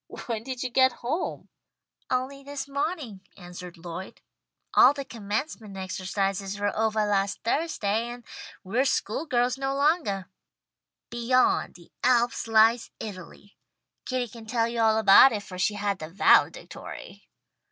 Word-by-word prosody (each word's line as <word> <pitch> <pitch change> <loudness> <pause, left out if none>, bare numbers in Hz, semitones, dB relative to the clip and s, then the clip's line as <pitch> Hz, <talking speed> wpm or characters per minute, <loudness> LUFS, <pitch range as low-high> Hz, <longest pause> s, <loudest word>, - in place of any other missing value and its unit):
"When 230 -3 -3
did 255 +1 -5
you 255 - -3
get 260 +1 +4
home?" 310 +9 -3 0.6
"Only 260 +2 -2
this 280 -1 -6
mawning," 280 - -3 0.2
answered 180 -1 -10
Lloyd. 170 +2 -8 0.5
"All 260 - +7
the 275 -1 -5
Commencement 215 -1 -5
exercises 195 +1 -3
were 205 0 -1
ovah 220 -1 +1
last 200 -1 0
Thursday, 230 -6 -1
and 240 0 -8 0.4
we're 220 +7 +1
school 270 +3 -1
girls 250 0 +1
no 270 0 -1
longah. 280 - +1 0.9
'Beyond, 240 +2 +2
the 170 -2 -17
Alps 240 -2 +2
lies 225 +1 +4
Italy!' 200 -1 -10 0.5
Kitty 255 -1 -1
can 225 0 -12
tell 230 0 +1
you 235 0 -4
all 220 -1 +4
about 220 +5 +8
it, 205 -2 -3
for 185 -2 -9
she 205 +3 +1
had 200 -1 -2
the 155 - -7
Valedictory." 205 - 0
225 Hz, 140 wpm, -26 LUFS, 200-255 Hz, 0.9 s, about